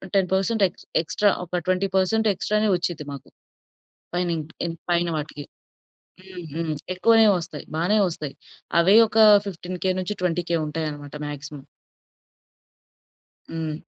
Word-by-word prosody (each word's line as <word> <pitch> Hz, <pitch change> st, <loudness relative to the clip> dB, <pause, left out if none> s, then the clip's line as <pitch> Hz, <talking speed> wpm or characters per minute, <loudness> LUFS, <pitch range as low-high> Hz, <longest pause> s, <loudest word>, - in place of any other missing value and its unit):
10% 195 Hz, +3 st, +2 dB
X -, -, -19 dB, 0.2 s
extra 205 Hz, +4 st, +2 dB, 0.2 s
ఒక 175 Hz, 0 st, -2 dB
20% 190 Hz, +3 st, +2 dB
ఎక్స్ట్రానే 210 Hz, +2 st, 0 dB
వచ్చిద్ది 170 Hz, -4 st, -4 dB
మాకు. 140 Hz, -, -10 dB, 0.9 s
పైనిం 175 Hz, -2 st, 0 dB, 0.3 s
ఇంక్ 165 Hz, -1 st, -6 dB
పైన 175 Hz, 0 st, +2 dB
వాటికి. 150 Hz, -1 st, -6 dB, 0.8 s
హ్మ్. 185 Hz, -2 st, -9 dB
హ్మ్. 165 Hz, -1 st, -2 dB, 0.2 s
ఎక్కువనే 225 Hz, +4 st, +5 dB
వస్తాయి. 160 Hz, -3 st, -7 dB
బానే 175 Hz, +7 st, +1 dB
వస్తాయి. 150 Hz, -4 st, -6 dB, 0.5 s
అవే 190 Hz, +5 st, +5 dB
ఒక 220 Hz, +1 st, 0 dB, 0.3 s
15000 180 Hz, 0 st, -3 dB
నుంచి 185 Hz, +3 st, -2 dB
20000 170 Hz, -1 st, 0 dB
ఉంటాయి 155 Hz, +1 st, -3 dB
అన్నమాట 145 Hz, -1 st, -9 dB
మాక్సిమం. 145 Hz, -1 st, -8 dB, 1.9 s
హ్మ్. 160 Hz, -1 st, -4 dB
175 Hz, 115 wpm, -24 LUFS, 155-190 Hz, 1.9 s, ఎక్కువనే